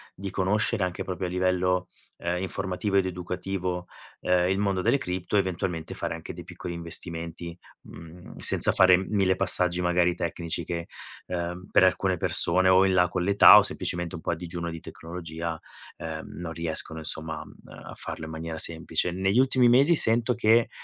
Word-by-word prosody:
di 95 +1 -7
conoscere 105 +2 0
anche 90 0 -5
proprio 90 0 -5
a - - -5
livello, 90 0 -1 0.3
ehm, 90 +1 -3
informativo 95 +1 -3
ed 95 -1 +3
educativo, 90 0 -5 0.4
ehm, 90 0 +1
il 95 - 0
mondo 100 -2 -1
delle 140 - +2
cripto, 90 -5 -5
eventualmente 90 -4 -3
fare - - -4
anche - - -9
dei - - -10
piccoli 90 - -8
investimenti, 85 0 -6 0.3
mhmm, 85 +2 -13
senza - - +6
fare 90 -1 +5
1000 95 0 0
passaggi 90 -1 +3
magari 90 0 +1
tecnici 85 0 -4
che, 85 0 -5 0.4
ehm, 90 +1 -5
per - - +3
alcune 95 0 +1
persone 95 +3 +3
o 95 +1 +5
in 95 - +1
là 90 -1 +3
con 90 - -3
l'età 100 +2 +7
o - - +1
semplicemente 85 +1 -3
un 85 - -9
po' 85 - -3
a - - -2
digiuno 85 0 -6
di 85 - -8
tecnologia, 80 -1 -7 0.4
ehm, 80 -1 -7
non 85 -2 -8
riescono 80 -1 0
insomma, 80 0 -2
uhm, - - -16
a - - -11
farlo 80 - -7
in 80 - -9
maniera 80 0 -6
semplice. 80 +1 +1
Negli 95 +5 0
ultimi 130 -1 +3
mesi 140 +8 +5
sento 115 -1 +5
che 115 0 +2
90 Hz, 175 wpm, -25 LUFS, 85-95 Hz, 0.4 s, l'età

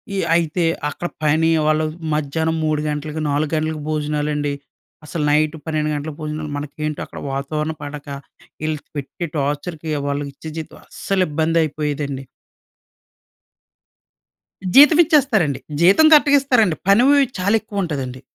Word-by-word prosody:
ఈ - - -1 0.2
అయితే, 170 +1 +1 0.3
అక్కడ 175 - -5 0.2
పని 160 +2 +3 0.2
వాళ్ళు 155 0 +2 0.3
మధ్యాహ్నం 160 +2 -1
3 155 -1 0
గంటలకి, 150 +1 -4
4 145 +1 0
గంటలకి 155 -1 -2
భోజనాలండి. 150 -1 -1 0.5
అసలు 150 0 -3
నైట్ 155 +1 +2
12 155 -1 -1
గంటలకు 145 0 -5
భోజనాలు. 155 0 -4
మనకేంటో 150 +1 -4
అక్కడ - - -10
వాతావరణం 150 +3 -3
పడక. 145 0 -8 0.6
ఈళ్ళు 155 -2 -2 0.2
పెట్టి 145 +5 -5
టార్చర్‌కి 150 +3 -3 0.2
వాళ్ళకి 140 0 -2
ఇచ్చే 160 +3 -9
జీతం 160 - -7
అస్సలు 195 -2 -1
ఇబ్బంది 160 +2 0
అయిపోయేదండి. 145 -3 -3 2.5
జీతం 295 +3 +8
ఇచ్చేస్తారండి. 255 - +2 0.2
జీతం 195 - +6
కరెక్ట్‌గా 285 -1 +6
ఇస్తారండి. 225 - +3
పని 200 +5 +6
వ్ - - +6 0.3
చాలా 200 +4 +2
ఎక్కువ 200 -2 -3
ఉంటదండి. 130 -6 -4
155 Hz, 130 wpm, -20 LUFS, 150-170 Hz, 2.5 s, జీతం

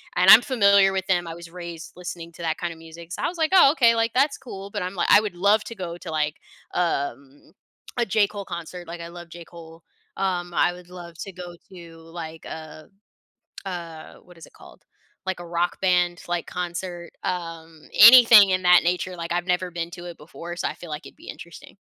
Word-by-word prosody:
And 180 +1 +4
I'm 220 - +11
familiar 200 -7 +4
with 190 -1 -2
them, 175 -2 +1
I 165 - -6
was 170 -1 -11
raised 170 -1 -9
listening 175 -2 -8
to - - -12
that 160 -2 -2
kind 175 -1 -4
of 160 - -17
music 165 +1 -13
so, - - -5
I - - +1
was, 345 - -6
like, 320 +1 0
"Oh, 355 -7 +7
okay. 235 -6 +4
Like, 230 0 0
that's 275 +3 +2
cool." 200 -7 -9
But 205 0 -5
I'm, 185 +2 -5
like, 175 - -1
I 205 - +8
would 205 -4 -5
love 205 +4 +3
to 230 - -8
go 175 -3 -6
to, 170 -2 -9
like, 150 -1 -1 0.4
um, 140 -5 -3 0.5
a 240 - +1
J. 205 0 +2
Cole 200 -1 -8
concert, 175 0 -8
like, 170 0 -8
I 170 - -7
love 175 0 -11
J. 170 0 -11
Cole, 165 -1 -14 0.3
um, 180 -2 -2
I 175 - +2
would 180 0 -14
love 175 -2 -11
to 195 - -6
go 175 -1 -9 0.2
to 170 -2 -13
like 165 -1 -9
a 155 -1 -9 0.8
a, 170 -4 -7
what 180 -1 -18
is 165 - -12
it - - -20
called? - - -17 0.4
Like 190 -1 -3
a 175 - -8
rock 170 +1 -2
band, 180 -2 +1
like 175 -1 -2
concert, 175 -1 -6
um, 165 -3 -5
anything 230 -3 +9
in 185 0 0
that 180 -1 +6
nature, 180 +1 -1
like 170 -1 -6
I've 175 0 -1
never 180 0 -1
been 170 -1 -4
to 175 0 -10
it 175 -1 -9
before, 170 +3 -9
so, - - -1
I - - -4
feel 175 - -12
like 150 +2 -6
it'd - - -13
be 325 - -13
interesting. - - -11
175 Hz, 225 wpm, -23 LUFS, 170-190 Hz, 0.8 s, I'm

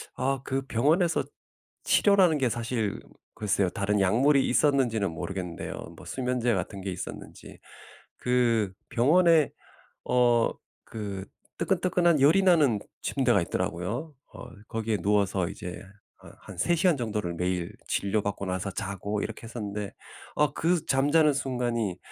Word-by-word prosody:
아 135 0 -1
그 135 0 -1
병원에서 155 - +2 0.6
치료라는 190 -6 +4
게 130 -3 +1
사실 115 -2 -2 0.4
글쎄요. 100 -3 +1
다른 100 +2 0
약물이 135 +9 +3
있었는지는 125 - +2
모르겠는데요. 90 0 -5 0.2
뭐 - - -13
수면제 125 -2 -1
같은 95 0 -3
게 95 - -4
있었는지. 90 - -8 0.6
그 115 -5 +1 0.2
병원에 160 +4 +4 0.6
어 120 -2 +3 0.3
그 100 -3 -6 0.3
뜨끈뜨끈한 175 -3 +2
열이 160 +8 +5
나는 155 - +4 0.2
침대가 125 -7 +2
있더라고요. 105 - -3 0.2
어 - - -9 0.2
거기에 110 -2 -2
누워서 100 -3 +1
이제 90 0 -7 0.4
한 - - -15
한 100 - -11
3 170 - +2
시간 170 -2 +3
정도를 105 -7 -2
매일 90 0 -2 0.2
진료받고 100 0 -1
나서 95 +2 -2
자고 100 +2 -3
이렇게 - - -6
했었는데 105 -3 -5 0.4
어 150 -1 +2
그 165 -1 0
잠자는 145 +3 +3
순간이 120 -8 -2
115 Hz, 290 characters per minute, -27 LUFS, 100-140 Hz, 0.6 s, 열이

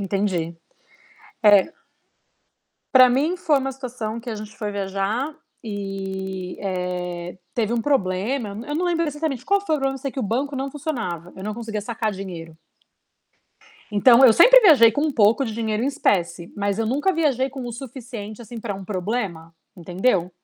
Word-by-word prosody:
Entendi. 195 -3 0 1.1
É 205 - +9 1.4
pra 255 -1 +8
mim 295 +9 +1
foi 310 -4 +2
uma 270 0 -3
situação 240 -4 -5
que 240 +1 -8
a 220 - -3
gente 215 0 -9
foi 210 -2 -3
viajar 200 +8 -2 0.3
e, 190 -3 -5
eh, 180 -2 -4 0.2
teve 230 -1 0
um 235 - 0
problema, 220 -1 0
eu 200 - -8
nã 225 - -8
eu 295 - -3
não 360 - 0
lembro 335 -1 +1
exatamente 295 -4 -3
qual 400 0 +3
foi 320 -6 0
o - - -2
problema, 270 0 0
eu - - -6
sei 270 0 -4
que - - -5
o 250 - -1
banco 265 +7 -2
não 270 +1 -3
funcionava, 230 - -4
eu 190 - -9
não 215 - -3
conseguia 220 -2 -5
sacar 220 0 -2
dinheiro. 170 -5 -8 1.3
Então, 235 +5 +6
eu 230 - +7
sempre - - +8
viajei 285 - +7
com 285 - -1
um 305 -1 +1
pouco 230 +3 +3
de 225 - -4
dinheiro 220 -1 -2
em - - 0
espécie, 175 - 0
mas 200 0 -1
eu 225 - 0
nunca 285 +11 +1
viajei 275 -5 +1
com 265 -1 -7
o 240 - -5
suficiente, 235 -3 -8
assim, 230 +1 -8
pra 210 -3 -4
um 195 - -8
problema, 185 -4 -4 0.2
entendeu. 180 +1 0
225 Hz, 180 wpm, -23 LUFS, 195-270 Hz, 1.4 s, É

